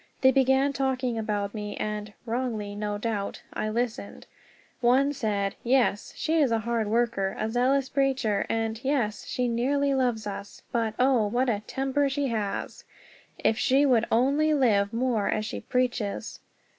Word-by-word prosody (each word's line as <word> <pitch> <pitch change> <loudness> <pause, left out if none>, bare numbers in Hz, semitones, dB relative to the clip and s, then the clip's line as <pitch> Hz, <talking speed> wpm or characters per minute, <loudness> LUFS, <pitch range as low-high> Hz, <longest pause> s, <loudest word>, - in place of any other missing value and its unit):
They 260 -1 +6
began 265 +1 +3
talking 260 -3 -1
about 205 -2 -2
me, 210 -2 -5
and 210 0 -3
(wrongly, 225 -4 -2
no 205 0 -3
doubt) 210 -2 -3
I 215 - -2
listened. 225 -2 -3 0.5
One 260 +3 +3
said, 205 -7 -1
"Yes, 245 -4 +2
she 325 +1 +1
is 275 -6 +3
a 230 - +3
hard 225 0 -1
worker, 220 -3 0
a 220 - -2
zealous 260 +3 +2
preacher, 265 -7 0
and 225 0 -2
yes, 240 -7 -1
she 250 -1 -1
nearly 275 +4 +1
loves 245 -4 0
us; 200 0 -7
but, 225 -3 -1
oh, 250 -4 +3
what 245 +4 +1
a 210 -3 +1
temper 270 +1 0
she 275 0 -1
has! 215 -4 -3 0.6
_If 220 - +3
she 270 +3 +3
would 240 -4 +3
only 285 +6 +3
live 210 -7 +3
more 230 -3 0
as 215 0 0
she 215 - -4
preaches! 245 -5 -2
235 Hz, 155 wpm, -27 LUFS, 215-265 Hz, 0.6 s, They